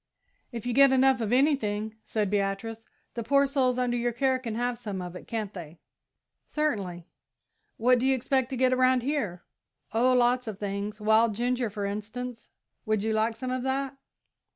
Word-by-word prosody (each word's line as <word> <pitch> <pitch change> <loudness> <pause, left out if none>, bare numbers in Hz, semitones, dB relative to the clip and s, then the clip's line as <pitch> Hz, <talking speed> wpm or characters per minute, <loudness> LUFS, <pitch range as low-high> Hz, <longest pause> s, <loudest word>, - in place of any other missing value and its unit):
"If 235 -2 -6
you 245 - -1
get 275 +1 +6
enough 265 -1 +4
of 220 -1 -1
anything," 220 -6 +1
said 210 -3 -1
Beatrice, 205 +3 -2 0.3
"the 235 - -4
poor 280 +4 +3
souls 265 -3 +1
under 250 -1 0
your 240 0 0
care 260 +2 +1
can 230 -4 -5
have 245 0 -1
some 205 -5 -5
of 180 0 -6
it, - - -10
can't 215 -3 -3
they?" 170 -3 -9 0.6
"Certainly." 200 - -2 0.7
"What 250 +2 +4
do 260 - +1
you 270 - +4
expect 260 0 0
to 265 - -4
get 255 0 +3
around 255 -1 +3
here?" 235 - -2 0.5
"Oh, 250 +3 +3
lots 250 0 +3
of 215 -3 -5
things. 205 +1 -4
Wild 220 +1 +3
ginger, 245 +1 0
for 205 -1 -4
instance 220 +4 -5 0.3
would 215 -1 0
you 220 0 0
like 220 +1 +1
some 255 +3 -4
of 255 0 -1
that?" 265 +1 -2
235 Hz, 180 wpm, -28 LUFS, 210-255 Hz, 0.7 s, get